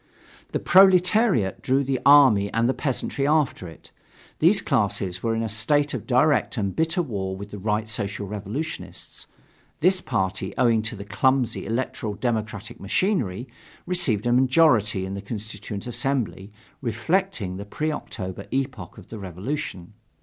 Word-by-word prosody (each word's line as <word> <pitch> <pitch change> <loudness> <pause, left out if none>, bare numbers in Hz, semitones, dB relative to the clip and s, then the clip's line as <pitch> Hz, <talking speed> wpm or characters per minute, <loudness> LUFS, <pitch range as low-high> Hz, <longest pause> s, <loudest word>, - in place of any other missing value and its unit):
The - - 0
proletariat 185 - +4
drew 135 +2 +1
the 135 -1 -1
army 130 -9 +6
and 115 +1 +2
the 130 - +2
peasantry 140 0 -2
after 150 - +1
it. 80 - -14 0.5
These - - +5
classes 90 -1 0
were 115 -1 0
in 115 - -1
a - - -1
state 145 +7 +1
of - - -5
direct 130 +1 +2
and 100 -3 -2
bitter 165 +3 +1
war 95 - -4
with 100 +1 -9
the 105 - -7
Right 105 +2 -1
Social 100 -1 -2
Revolutionists. 105 +11 -6 0.5
This 185 +3 +3
party, 95 -5 -2
owing 115 -3 +3
to 115 +2 -3
the 100 -1 -8
clumsy 125 +3 +1
electoral 115 -2 -3
democratic 110 -2 -3
machinery, 120 - -1 0.4
received 135 - +1
a 120 - +2
majority 125 - +3
in 95 - -5
the 100 - -5
Constituent 105 0 -6
Assembly, 120 -6 -2 0.3
reflecting 120 - -1
the 100 - -7
pre 155 +9 -2
October 100 -9 -6
epoch 130 - -3
of - - -14
the 110 - -7
revolution. 95 - -5
115 Hz, 150 wpm, -24 LUFS, 100-140 Hz, 0.5 s, army